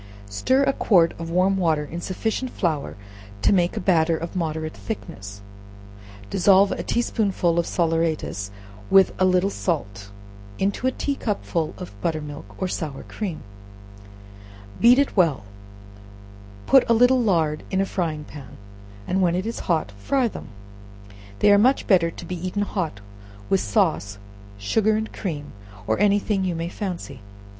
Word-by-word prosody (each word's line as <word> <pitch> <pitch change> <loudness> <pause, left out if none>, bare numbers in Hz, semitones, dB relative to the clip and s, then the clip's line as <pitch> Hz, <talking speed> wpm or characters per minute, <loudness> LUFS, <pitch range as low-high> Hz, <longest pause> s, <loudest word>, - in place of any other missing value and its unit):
Stir 260 - +2
a 275 0 +2
quart 175 -10 +3
of 165 0 -5
warm 185 +3 +2
water 160 -5 +1
in 170 +3 -6
sufficient 220 +8 -2
flour 150 - -2 0.5
to - - +4
make 175 -2 +1
a - - +1
batter 165 -3 +2
of 170 +2 -6
moderate 160 -2 -2
thickness; 100 - -7 0.9
dissolve 195 +1 +5
a - - -2
tea 240 - 0
spoonful 185 -7 0
of 170 - -1
salaeratus, 165 - -1 0.4
with 195 -1 +5
a - - +6
little 185 +1 +2
salt, 105 - -3 0.5
into 200 +6 0
a - - +2
tea 280 - -2
cupful 195 - -2
of 180 - -8
butter 160 -2 0
milk, 145 -9 -9
or 185 - -1
sour 155 -6 -4
cream; 190 -7 -5 1.4
beat 240 +2 +7
it 280 0 +1
well; 165 - +2 1.2
put 270 - +6
a - - +6
little 245 +2 +5
lard 165 -8 +1
in 190 - 0
a 195 - +2
frying 165 -6 -2
pan, 145 -5 -11 0.5
and 190 +1 +1
when 175 -2 +2
it 185 +2 -2
is 230 - -4
hot, 160 - +1
fry 260 - +1
them. - - -8 0.9
They 205 - +4
are 205 - +6
much 255 +6 +3
better 175 -4 +4
to - - -10
be 180 -2 -6
eaten 205 +3 -1
hot, 170 - -3 0.5
with 195 - +4
sauce, 155 - 0 0.4
sugar 210 - +1
and 220 +1 -3
cream, 150 -7 -5 0.3
or 110 +1 0
any 205 -1 +4
thing 200 -1 -1
you 180 -2 -1
may 165 +1 -3
fancy. 175 - -6
180 Hz, 160 wpm, -23 LUFS, 155-205 Hz, 1.4 s, beat